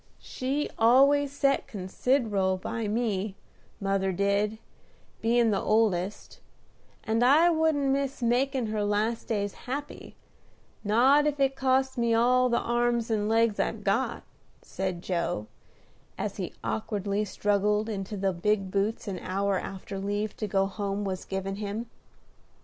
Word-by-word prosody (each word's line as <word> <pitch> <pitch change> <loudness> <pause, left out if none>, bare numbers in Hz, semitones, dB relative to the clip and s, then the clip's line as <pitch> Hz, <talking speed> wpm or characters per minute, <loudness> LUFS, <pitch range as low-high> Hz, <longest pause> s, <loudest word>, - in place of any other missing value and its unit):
"She 275 +3 -3
always 275 +5 +5
set 275 -1 +1
consider'ble 200 -1 0
by 225 +3 -3
me, 210 -3 -1 0.4
mother 195 -1 0
did, 200 +3 0 0.6
bein' 230 0 +3
the 195 - 0
oldest; 210 -3 0 0.6
and 225 +2 +1
I 310 +7 +6
wouldn't 315 -3 +2
miss 275 0 -1
makin' 255 +2 +1
her 215 -1 -1
last 210 +3 0
days 205 -3 -1 0.2
happy, 285 +3 -6 0.7
not 260 +8 +4
if 290 -1 -1
it 270 -1 +2
cost 265 -1 +1
me 235 -1 +2
all 250 +2 +4
the 235 - +2
arms 240 -1 0
and 210 -1 0
legs 225 -1 +2
I've - - -1
got," - - 0 0.4
said 185 -2 -4
Joe, 170 - -2 0.7
as - - -4
he - - -4
awkwardly 200 - -2
struggled 210 +1 0
into 205 -1 -4
the 195 0 0
big 195 +2 0
boots 205 +3 -1
an 190 -3 -3
hour 195 +1 -1
after 195 0 -6
leave 205 +2 -2
to 215 - -3
go 195 -1 +2
home 200 0 -3
was 185 -1 -4
given 195 0 -4
him. 210 +2 -4
215 Hz, 140 wpm, -28 LUFS, 195-245 Hz, 0.7 s, I